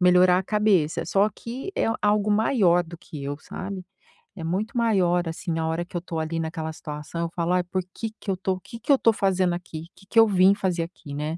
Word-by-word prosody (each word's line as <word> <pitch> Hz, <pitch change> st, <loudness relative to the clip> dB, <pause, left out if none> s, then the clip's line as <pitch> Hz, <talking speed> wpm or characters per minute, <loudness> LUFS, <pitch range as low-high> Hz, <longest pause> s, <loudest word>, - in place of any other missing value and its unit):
melhorar 180 Hz, 0 st, +6 dB
a -, -, -1 dB
cabeça, 195 Hz, -6 st, +2 dB
só 200 Hz, +2 st, +3 dB
que 255 Hz, -, -7 dB
é -, -, +2 dB, 0.2 s
algo 210 Hz, 0 st, +2 dB
maior 205 Hz, -5 st, +4 dB
do 170 Hz, 0 st, -11 dB
que 155 Hz, -6 st, -9 dB
eu, 145 Hz, +1 st, -4 dB
sabe, 185 Hz, +2 st, -6 dB, 0.5 s
é 165 Hz, -, -7 dB
muito 210 Hz, +8 st, -2 dB
maior, 180 Hz, -7 st, +2 dB
assim, 165 Hz, +2 st, -4 dB
na 160 Hz, 0 st, -1 dB
hora 165 Hz, +2 st, -1 dB
que 175 Hz, 0 st, -6 dB
eu -, -, -3 dB
tô, 170 Hz, -1 st, -5 dB
ali, 160 Hz, +1 st, -2 dB
naquela 160 Hz, 0 st, -3 dB
situação, 150 Hz, +2 st, -6 dB
eu 170 Hz, -, -1 dB
falo: 170 Hz, 0 st, 0 dB
"Ai, 180 Hz, 0 st, +2 dB
por 185 Hz, +1 st, -2 dB
que 225 Hz, -1 st, -4 dB
que 200 Hz, -, -2 dB
eu 185 Hz, -, -1 dB
tô 190 Hz, 0 st, -1 dB
que 230 Hz, -, -10 dB
que 285 Hz, -, 0 dB
eu 275 Hz, -, +7 dB
tô 230 Hz, -, +4 dB
fazendo 190 Hz, -3 st, +1 dB
aqui? 170 Hz, -2 st, -6 dB
Que 195 Hz, -, -19 dB
que 230 Hz, -, +4 dB
eu 225 Hz, -, +8 dB
vim 190 Hz, -1 st, +5 dB
fazer 180 Hz, -4 st, 0 dB
aqui", 165 Hz, -4 st, -9 dB
né, 150 Hz, +3 st, -3 dB
180 Hz, 235 wpm, -25 LUFS, 165-205 Hz, 0.5 s, eu